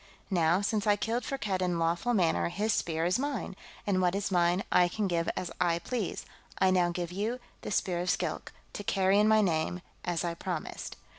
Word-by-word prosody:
Now, 170 0 +3
since 210 0 0
I 205 - +5
killed 225 +4 -1
Firkked 210 -9 -2
in 180 -2 +1
lawful 170 +9 +1
manner, 170 -3 +2
his 210 +5 0
Spear 160 -1 0
is 180 +7 +2
mine, 275 -8 -3 0.3
and 190 -2 +2
what 180 0 +2
is 200 0 -1
mine 175 +1 +3
I 180 - +5
can 205 +3 -1
give 170 -2 0
as 180 - -3
I 170 -2 +3
please. 215 +3 -3 0.3
I 190 -1 +4
now 180 -2 +3
give 175 0 -3
you 215 +7 -2 0.2
the - - -5
Spear 180 -3 0
of 180 +1 -1
Skilk, - - -1 0.2
to 205 - -5
carry 195 0 +3
in 210 - +5
my 220 0 +5
name, 175 -1 0 0.2
as 175 -1 -1
I 170 - -1
promised." 170 - -5
185 Hz, 205 wpm, -30 LUFS, 175-205 Hz, 0.3 s, I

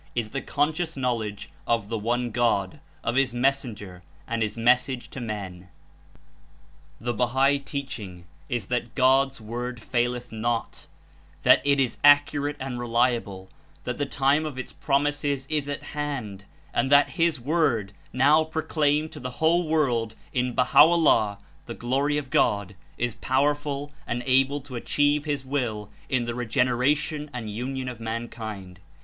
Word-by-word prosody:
Is 115 -3 -2
the 135 - -3
conscious 160 +2 -1
knowledge 115 -6 -2 0.2
of 115 -3 0
the 115 - -1
One 120 +2 -1
God, 110 -5 0 0.2
of 115 - 0
His 130 -2 +2
Mes 130 +3 +4
senger 105 -7 -9 0.3
and 115 0 -2
His 110 +1 -1
Message 125 +2 +2
to 135 - -6
men. 95 -5 -6 1.3
The 120 +1 -2
Bahal 130 +5 +2
teaching 120 - -6 0.2
Is 120 -3 -2
that 120 -2 -3
God's 135 +1 +3
Word 120 +2 -5
falleth 120 +1 -2
not, 115 +1 -3 0.6
that - - +6
It 140 -1 +3
Is 130 -4 0
accurate 145 0 +5
and 130 -2 -4
reliable, 115 -5 0 0.3
that - - -4
the 145 - 0
time 140 +2 +2
of 150 -4 -5
its 130 - -6
promises 145 -1 0
Is 150 -2 0
at 145 - -4
hand 125 -10 -5 0.3
and 135 - 0
that 145 0 +6
His 165 -4 +1
Word, 125 - 0 0.2
now 145 +5 +4
pro 160 0 -4
claimed 155 0 +1
to 150 - -9
the 125 -1 -5
whole 170 +1 +3
world 120 -8 +1 0.2
In 125 -2 0
Baha'o'llah 140 -7 +5 0.3
(The - - -6
Glory 140 +5 0
of 140 -3 -5
God), 100 -1 +1 0.2
Is 120 -1 -1
powerful 145 +2 -1 0.2
and 120 +1 -2
able 135 +2 +3
to 135 -2 -10
achieve 145 +4 +1
His 145 -3 -2
Will 115 -7 -2 0.2
in 125 -3 +1
the 120 - -3
regeneration 125 +5 0
and 110 -4 -5
union 130 +4 -4
of 125 -3 -6
mankind. 110 -5 -6
125 Hz, 150 wpm, -25 LUFS, 115-145 Hz, 1.3 s, that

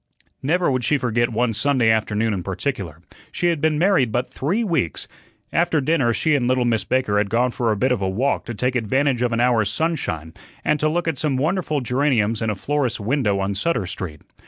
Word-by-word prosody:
Never 170 +3 +1
would 130 -1 -1
she 150 - +2
forget 120 -2 0
one 115 +1 0
Sunday 120 0 +2
afternoon 110 0 0
in 95 - -2
particular. 95 - -4 0.3
She 175 - 0
had 165 -4 -1
been 155 -1 +2
married 170 - +3
but 120 +3 -1
three 185 - 0
weeks. 160 - -1 0.5
After 170 -2 +2
dinner 140 -4 +2
she 155 +6 +1
and 130 -4 +2
little 125 -1 +2
Miss 115 -4 +1
Baker 115 -5 +1
had 100 -1 0
gone 120 +3 +1
for 120 -2 0
a 105 - 0
bit 130 +5 +1
of 125 -5 0
a 95 - 0
walk 125 +9 0
to 120 - -5
take 125 +5 -1
advantage 130 +2 +1
of 125 -1 +1
an 115 - 0
hour's 120 -4 +2
sunshine 105 - -2 0.3
and 150 - +2
to 155 - +2
look 170 +2 -1
at 155 -6 -1
some 145 -4 0
wonderful 155 0 0
geraniums 125 -4 +1
in 110 - 0
a 105 - -1
florist's 135 +2 -1
window 105 -2 0
on 100 +1 -1
Sutter 105 - -1
Street. 85 -4 -6
125 Hz, 215 wpm, -22 LUFS, 110-145 Hz, 0.5 s, married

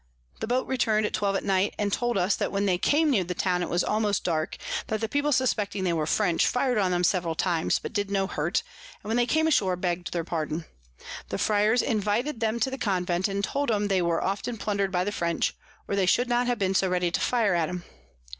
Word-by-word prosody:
The - - -3
Boat 250 +2 +1
return'd 220 -5 +1
at - - -3
twelve 200 -1 0
at - - -1
night, 195 0 +1
and 205 -2 -1
told 240 -2 0
us 185 +2 +2
that - - -2
when 200 0 0
they 180 -3 +1
came 300 - +3
near 205 -8 +2
the 180 +1 -4
Town 180 0 0
it 175 - -2
was 175 - +1
almost 210 -2 0
dark; 160 0 -1 0.3
that 220 - -1
the 225 - -1
People 285 +5 0
suspecting 215 -7 0
they 175 -2 +1
were 155 -2 -1
French, 175 -2 +2
fir'd 250 -2 +1
on 190 -2 +1
'em 175 0 +1
several 175 -2 +1
times, 170 -1 +1
but - - -7
did 205 -2 -1
no 195 -1 +1
hurt, 170 -1 -1 0.4
and 210 - -7
when 225 - +1
they 240 0 +2
came 315 +3 +2
ashore 200 -13 +2
begg'd 175 -1 -2
their 170 -1 -1
pardon. 160 -1 -3 0.6
The - - -2
Fryars 215 +3 +2
invited 220 +5 0
them 225 0 0
to 265 - +1
the 265 - -5
Convent, 180 -2 0
and 200 0 -2
told 280 +7 -1
'em 210 -2 +1
they 190 -2 +2
were 170 -1 0
often 205 +5 -2
plunder'd 200 -2 -1
by 180 -1 +1
the 205 - -2
French, 170 -4 -1 0.3
or 200 - -1
they 195 -2 +1
should 245 +6 +3
not 245 0 +1
have 245 -1 +1
been 195 -2 0
so 190 0 +2
ready 180 -1 0
to - - 0
fire 225 -6 +2
at 170 -3 +1
'em. 180 -1 -5
200 Hz, 240 wpm, -26 LUFS, 180-225 Hz, 0.6 s, came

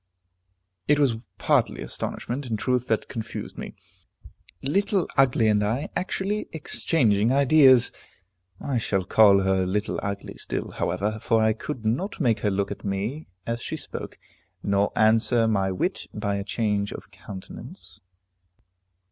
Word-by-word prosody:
It 150 - +4
was 135 -6 +2 0.2
partly - - +1
astonishment, 130 +3 -4
in 110 -2 -1
truth, 125 +3 0
that 110 - 0
confused 115 -2 -6
me. - - -7 0.9
Little 190 +5 +1
Ugly 130 -4 +4
and 105 -1 +3
I 120 +8 -1
actually 195 +3 -2
exchanging 120 -8 +2
ideas! 135 -2 +6 0.7
I 130 -4 -1
shall 95 -4 0
call 100 0 +6
her 95 -1 +2
Little 100 +3 -1
Ugly 100 0 -5
still, - - -4
however, 100 +5 -2
for 115 -1 +2
I 110 0 +3
could 115 +1 -6
not 135 - -1
make 115 -2 +2
her 105 - +1
look 100 0 -1
at - - -7
me 105 +10 -3 0.2
as 115 +1 -3
she - - -4
spoke, - - -8 0.5
nor 100 0 +1
answer 115 +1 +3
my 95 -3 +1
wit 95 - -2
by 100 -1 -1
a 100 - -3
change 105 -2 -1
of - - -9
countenance. 95 -2 -10
110 Hz, 140 wpm, -25 LUFS, 100-130 Hz, 0.9 s, ideas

